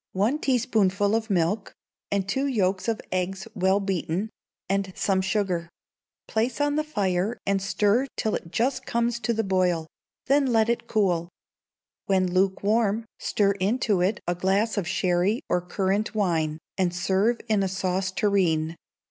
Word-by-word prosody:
One 215 +10 +1
teaspoonful 215 -7 +2
of 225 0 0
milk, 195 +2 0 0.3
and 200 -1 0
two 265 +8 0
yolks 195 -7 0
of 225 -2 -1
eggs 190 +1 -2
well 190 0 +2
beaten, 195 +1 -2 0.4
and 195 0 0
some 190 -2 +1
sugar; 190 -4 -1 0.6
place 230 +4 -1
on 290 0 +1
the 305 - +1
fire 200 -6 -1
and 200 -1 +1
stir 205 +6 +2
till 220 - 0
it 165 - -4
just 255 +7 0
comes 235 0 0
to 235 0 -1
the 225 -1 0
boil: 180 -4 +1 0.4
then 275 0 +3
let 225 -2 +3
it 235 - -1
cool. 175 -6 +1 0.8
When 185 -2 +2
lukewarm, 200 +4 +1
stir 200 -1 +2
into 205 -1 +1
it 195 +4 +1
a 175 - 0
glass 195 +5 +1
of 200 -5 -2
sherry 180 +7 +1
or 180 - +1
currant 195 +5 -1
wine, 165 -7 0 0.2
and 180 -2 +1
serve 195 +6 +1
in 215 -3 +2
a 195 - +1
sauce 185 0 -1
tureen. 170 -6 +1
195 Hz, 155 wpm, -25 LUFS, 185-220 Hz, 0.8 s, then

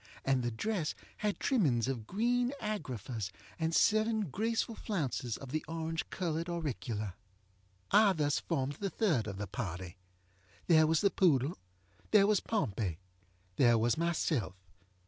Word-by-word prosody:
And 135 -1 +2
the 120 - 0
dress 165 - -2 0.2
had 210 -1 -1
trimmings 145 - +2
of 120 -5 -3
green 245 +5 +1
agraffas, 125 - -4 0.3
and 160 0 0
seven 215 -4 +3
graceful 225 - 0
flounces 135 - -2
of 135 -2 -9
the 155 +1 -1
orange 165 0 -3
colored 165 -1 -2
auricula. 115 - -3 0.8
I 210 -2 +6
thus 145 -4 +1
formed 135 +1 -2
the 200 - -1
third 165 - +1
of 100 -2 -5
the 105 - -3
party. 90 -4 -5 0.7
There 160 -2 +6
was 160 0 +3
the 200 - +3
poodle. 150 -4 +2 0.5
There 210 -2 +6
was 210 0 +3
Pompey. 105 - -1 0.6
There 120 -3 +5
was 115 +1 +2
myself. 160 - 0
155 Hz, 140 wpm, -33 LUFS, 120-200 Hz, 0.8 s, I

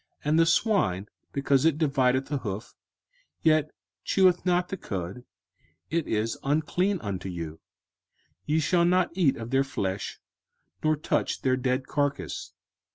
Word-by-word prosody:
05:014:008 150 - -3
And 160 - +4
the 165 - +6
swine, 165 - +2 0.2
because 140 -1 +2
it 160 -2 +3
divideth 135 -4 +2
the 145 -1 -2
hoof, 105 -2 -5 0.7
yet 155 -1 +4 0.3
cheweth 185 -2 +3
not 180 0 +2
the 195 - -3
cud, 95 - -5 0.7
it 165 -1 0
is 110 +1 -1
unclean 170 +7 +1
unto 95 -2 -4
you: 80 -3 -6 0.8
ye 155 +2 +1
shall 170 +3 +3
not 180 +1 +3
eat 170 -7 +2
of 115 +1 -7
their 135 0 +4
flesh, 100 -7 -3 0.6
nor 155 0 +3
touch 150 - -1
their 130 -1 +3
dead 130 +1 0
carcase. 135 - -2
140 Hz, 145 wpm, -27 LUFS, 110-165 Hz, 0.8 s, the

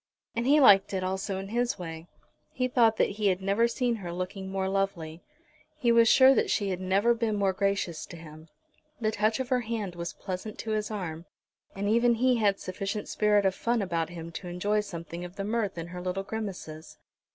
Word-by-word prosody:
And 235 +2 -1
he 295 +2 +6
liked 200 -6 +6
it 185 - -1
also 190 +1 -2
in 195 +1 -6
his 240 -1 0
way. 165 -2 -7 0.4
He 255 0 -1
thought 230 -3 +3
that - - +2
he 205 - +3
had 185 -2 +2
never 200 +4 +2
seen 240 0 -1
her 180 -5 -6
looking 185 +2 -5
more 190 0 -1
lovely. 180 -4 -2 0.6
He 245 -6 +2
was 230 -1 +6
sure 265 0 +7
that - - +1
she 200 -2 0
had 185 -1 -3
never 195 +5 +3
been 230 -2 -1
more 200 -2 +1
gracious 195 -4 -1
to 170 - -10
him. 155 0 -12 0.5
The 215 -2 0
touch 215 +3 +1
of 260 -1 -3
her 255 -2 +2
hand 215 -5 -3
was 170 0 -5
pleasant 190 +3 -6
to 220 - -4
his 215 -1 -1
arm, 175 -6 -5 0.5
and 200 +1 -2
even 235 +2 +4
he 250 +1 +3
had 205 -3 +2
sufficient 195 +3 -4
spirit 210 -1 +2
of 190 - +3
fun 235 +4 0
about 170 -5 -1
him 170 -1 -8
to 180 +2 -7
enjoy 200 +4 0
something 170 -3 -6
of 180 +1 -9
the 200 - -4
mirth 210 -3 -1
of 165 0 -5
her 180 0 -7
little 185 +2 -2
grimaces. 195 -7 -6
195 Hz, 210 wpm, -28 LUFS, 180-225 Hz, 0.6 s, sure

